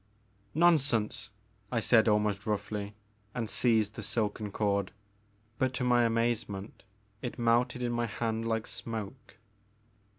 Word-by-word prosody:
'* 100 +2 -36
Nonsense,*' 135 -11 +2 0.4
I 115 - +1
said 115 0 +4
almost 105 -1 +1
roughly, 105 0 -3 0.4
and 115 -2 -2
seized 110 -2 +2
the 110 - -7
silken 105 -1 -2
cord, 100 -2 0 0.7
but 130 -1 +1
to 125 - -1
my 120 -1 +4
amazement 115 -3 -1 0.4
it 125 -2 -5
melted 120 +1 +2
in 120 - 0
my 120 0 0
hand 115 +1 -2
like 110 -1 0
smoke. 115 +2 -6
115 Hz, 130 wpm, -30 LUFS, 105-120 Hz, 0.7 s, said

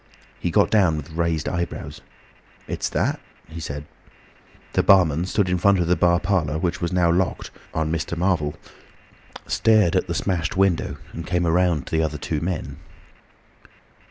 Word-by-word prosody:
He 85 - -1
got 100 +5 +3
down 95 -8 +3
with 75 +1 -7
raised 80 -1 -1
eyebrows. 85 -1 -4 0.7
"It's - - -2
that," - - 0 0.3
he 80 +1 -8
said. 75 -2 -6 0.9
The - - +3
barman 90 -4 +4
stood 95 +1 0
in 90 0 0
front 100 +2 +4
of 90 - +1
the 90 +2 +2
bar 85 -1 +3
parlour 90 -7 0
door 80 - -2
which 85 0 -2
was 85 - -1
now 90 -2 +3
locked 90 +1 -1 0.2
on 80 0 -1
Mr. 85 +1 -2
Marvel, 85 -5 0 0.9
stared 110 -6 +3
at - - +1
the - - -3
smashed 90 -3 -1
window, 90 -7 +1 0.2
and 85 0 -7
came 90 -1 0
round 85 -3 +2
to 80 - -2
the 75 0 -6
two 75 +2 -3
other - - -6
men. 75 -6 -4
85 Hz, 170 wpm, -23 LUFS, 80-90 Hz, 0.9 s, barman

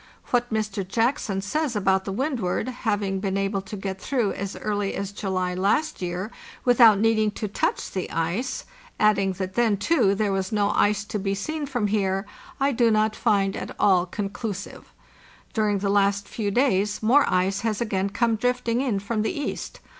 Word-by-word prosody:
What 245 -1 +1
Mr. 215 -2 -1
Jackson 225 -2 0
says 275 +5 -1
about 190 -2 +2
the 195 - -3
Windward 235 -4 -1
MR. - - -4
JACKSON 255 - -7
AT - - -14
ELMWOOD - - +3
having 200 -2 -1
been 195 0 -1
able 195 0 0
to 205 +2 -8
get 190 -1 -5
through 240 -6 0
as 200 0 -5
early 205 -2 -2
as 200 0 -3
July 185 -3 -2
last 205 +13 0
year 180 +4 -3 0.3
without 235 -4 +7
needing 220 0 +3
to 210 +1 -4
touch 200 - -1
the 185 - -3
ice, 170 +11 -2 0.3
adding 200 -2 +3
that 185 0 -4
then, 225 -2 +2
too, 215 - +2
there 205 0 0
was 190 -1 -1
no 205 -1 +2
ice 205 0 +2
to 210 0 -4
be 195 0 -1
seen 300 +8 -3
from 245 -6 -1
here, 195 -1 0 0.3
I 275 +1 +2
do 235 -2 +3
not 215 0 +2
find 195 -2 +1
at - - -6
all 185 -2 +4
conclusive. 200 +1 -5 0.6
During 210 -2 +1
the 200 0 -1
last 200 0 +2
few 210 -3 -2
days 210 -3 +1
more 265 +6 +4
ice 185 +2 +1
has 220 -2 -1
again 200 -4 -1
come 230 +2 +1
drifting 245 0 0
in 250 -7 0
from 210 +2 -2
the 220 +6 -2
east. 290 - -5
205 Hz, 190 wpm, -25 LUFS, 195-230 Hz, 0.6 s, without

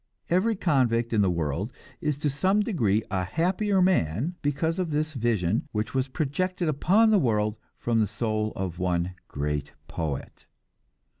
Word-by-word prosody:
Every 205 +6 +3
convict 125 - +1
in 105 - +4
the 95 - +3
world 85 - -1 0.3
is 150 -2 0
to 145 0 0
some 190 +8 +2
degree 115 - +1
a 95 -2 0
happier 185 - +1
man 145 - +1
because 155 +4 0
of 180 -3 -1
this 155 +1 -1
vision 110 - 0
which 105 0 -2
was 130 0 +1
projected 175 +6 -1
upon 195 +9 +4
the 210 - +5
world 105 - +1 0.2
from 115 -1 0
the 110 - +3
soul 110 +1 -1
of 95 -2 -4
one 90 0 0
great 75 0 -3
poet. 75 -4 -5
120 Hz, 155 wpm, -27 LUFS, -, 0.3 s, the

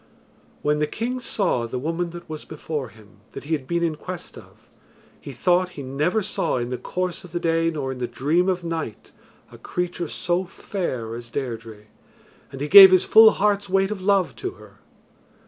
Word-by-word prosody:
When 150 0 +1
the 150 - +1
king 245 +9 -3
saw 185 - -1
the 120 - -4
woman 165 +6 -2
that 175 0 -10
was 155 -1 -7
before 150 -4 -5
him 105 -2 -19
that - - -8
he 155 +3 -3
had 135 -4 -2
been 170 +2 0
in 165 -2 0
quest 180 +2 -8
of, - - -16 0.5
he - - -9
thought 180 0 +1
he 140 - -5
never 150 +11 0
saw - - -1
in 120 0 -3
the 125 - -4
course 185 0 -4
of 180 -2 -13
the 175 - -1
day 165 0 +1
nor 145 -5 -3
in 130 - -7
the 120 - -2
dream 150 +10 +1
of 180 -1 -1
night 165 -10 -5 0.4
a - - -14
creature 175 -1 -3
so 175 +4 -1
fair 170 - -5
as 120 0 -8
Deirdre 115 -5 -6 0.7
and 135 -1 -8
he 145 - -1
gave 195 +3 +11
his 185 -1 +4
full 220 0 +8
heart's 205 -1 0
weight 195 +1 +2
of 205 -3 -4
love 195 -2 +2
to 380 0 -4
her. - - -17
165 Hz, 200 wpm, -23 LUFS, 130-185 Hz, 0.7 s, gave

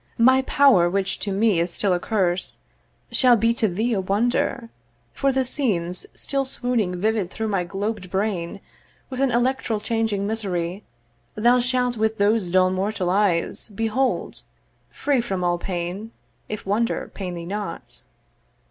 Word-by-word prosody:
'My 260 +3 +5
power, 265 -10 +4
which 195 +1 -1
to 205 - -3
me 200 -2 +2
is 170 +1 +1
still 195 +1 +1
a 175 - +1
curse, 185 -2 0 0.5
'Shall 250 -2 +5
be 230 +1 +2
to 230 -1 +1
thee 220 +6 -1
a 195 - +1
wonder; 230 +4 0 0.4
for 275 0 +1
the 265 0 +1
scenes 185 - 0
'Still 275 -1 0
swooning 240 -8 -1
vivid 215 -2 0
through 220 +2 -3
my 195 -3 0
globed 200 +1 -4
brain 195 -1 -2 0.5
'With 255 - -4
an 275 - +3
electral 245 -2 0
changing 220 -2 -1
misery 195 -3 -2 0.5
'Thou 240 +3 +4
shalt 250 -1 +1
with 220 0 0
those 205 -2 +2
dull 185 +1 +4
mortal 190 -1 -1
eyes 190 -3 +1
behold, 225 +5 -1 0.5
'Free 280 -4 0
from 190 -6 -3
all 175 0 +1
pain, 185 +5 -4 0.4
if 215 - -5
wonder 215 +4 -1
pain 180 -3 -5
thee 170 -1 -6
not.' 205 +3 -5
210 Hz, 150 wpm, -23 LUFS, 185-235 Hz, 0.5 s, My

